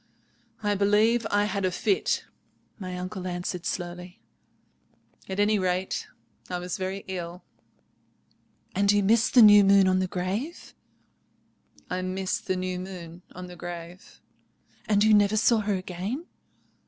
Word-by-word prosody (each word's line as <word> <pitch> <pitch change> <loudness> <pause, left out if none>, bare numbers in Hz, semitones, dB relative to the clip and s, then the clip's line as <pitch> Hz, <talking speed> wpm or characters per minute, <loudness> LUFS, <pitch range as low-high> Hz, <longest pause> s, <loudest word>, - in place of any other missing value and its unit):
"I 205 0 +2
believe 210 +3 +3
I 205 0 +2
had 200 -1 -2
a 185 - +2
fit," 390 - 0 0.5
my 185 -2 -5
uncle 185 +1 -5
answered 175 -1 -4
slowly; 180 0 -5 1.1
"at 190 +1 -3
any 210 0 +3
rate, 185 0 -1 0.4
I 180 - -2
was 180 0 -4
very 190 +1 -4
ill." 180 -1 -6 1.3
"And 200 +1 +3
you 205 -1 +2
missed 230 +5 +3
the 245 - +9
new 205 -1 +9
moon 195 -1 +5
on 185 0 +3
the 185 - 0
grave?" 195 - -4 1.1
"I 185 0 -3
missed 185 +1 -3
the 185 - +1
new 185 0 -3
moon 180 -2 -8
on 180 0 -7
the 180 0 -10
grave." 175 +1 -9 0.7
"And 205 -1 +3
you 215 0 +5
never 205 0 +4
saw 225 +1 +4
her 205 -1 0
again?" 190 - -4
190 Hz, 140 wpm, -26 LUFS, 180-205 Hz, 1.3 s, the